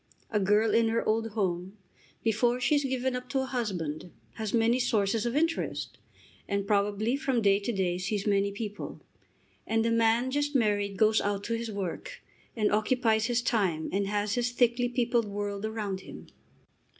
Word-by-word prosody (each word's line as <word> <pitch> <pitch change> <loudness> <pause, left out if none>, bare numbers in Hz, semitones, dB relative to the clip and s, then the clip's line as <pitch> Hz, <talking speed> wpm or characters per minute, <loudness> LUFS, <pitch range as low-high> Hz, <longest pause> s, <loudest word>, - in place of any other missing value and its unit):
A 210 - +2
girl 210 +2 +3
in 230 0 +4
her 230 +1 0
old 225 +1 +1
home, 190 -1 -2 0.5
before 235 +2 +2
she 250 +4 +2
is 290 -1 +3
given 260 -1 -1
up 250 0 -6
to 270 - 0
a - - -2
husband, 180 - -3 0.2
has 220 -2 -4
many 235 +2 +3
sources 225 -2 +1
of 240 - -2
interest, 330 +2 -1 0.5
and 200 -1 -1
probably 205 +3 +1
from 275 -4 0
day 200 0 +4
to 205 +4 -2
day 185 -4 -1
sees 200 +2 -2
many 200 -1 +2
people. 205 0 -6 0.7
And 225 0 +1
the 230 - +2
man 230 +2 +2
just 290 +1 -1
married 205 -4 +1
goes 215 +1 +4
out 200 -1 -1
to 230 - -2
his 230 0 -4
work, 200 - -5 0.3
and 215 -3 +1
occupies 220 +1 +2
his 240 0 0
time, 190 -10 0
and 195 +1 0
has 205 0 -1
his 245 +1 0
thickly 245 0 +2
peopled 240 -1 +1
world 205 0 -3
around 210 -3 -3
him. - - -11
220 Hz, 175 wpm, -29 LUFS, 200-240 Hz, 0.7 s, in